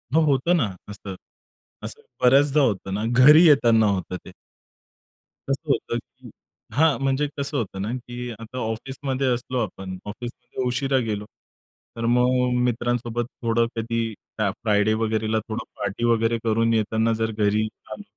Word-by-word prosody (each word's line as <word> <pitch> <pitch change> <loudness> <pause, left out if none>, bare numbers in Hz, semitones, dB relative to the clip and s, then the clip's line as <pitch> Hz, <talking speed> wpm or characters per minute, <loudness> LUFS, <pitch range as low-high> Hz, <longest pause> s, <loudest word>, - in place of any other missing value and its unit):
हो 160 - +6
होतं 140 +6 +2
ना 125 -9 +1 0.2
असं, 100 -2 -7 0.7
असं - - -6 0.2
बऱ्याचदा 140 +3 +5
होतं 100 -7 0
ना 105 +2 -2 0.2
घरी 155 +4 +9
येताना 115 -7 +5
होतं 95 -2 -1
ते. - - -10 1.2
कसं - - -3
होतं - - -1
की - - -16 0.4
हां, 155 +1 +4
म्हणजे 135 +2 +1
कसं 140 +1 -2
होतं 100 -5 -3
ना 105 - -2
की 120 0 -6
आता 115 +3 -9
ऑफिसमध्ये 130 +4 -3
असलो 125 +1 -3
आपण 95 -3 -6
ऑफिसमध्ये 120 +4 -6
उशिरा 135 +2 +1
गेलो, 105 -1 -3 0.7
तर 115 0 -3
मग 125 0 +2
मित्रांसोबत 120 0 -1 0.2
थोडं 115 0 +2
कधी 115 0 -2 0.2
काय 105 -3 +1
फ्रायडे 105 -1 +3
वगैरेला 110 0 0
थोडं 110 +2 -4 0.2
पार्टी 100 +3 -3
वगैरे 115 0 +2
करून 115 0 +2
येताना 110 +1 +1
जर 110 0 0
घरी 105 0 +1 0.2
आलो 205 - -7
115 Hz, 145 wpm, -24 LUFS, 110-130 Hz, 1.2 s, घरी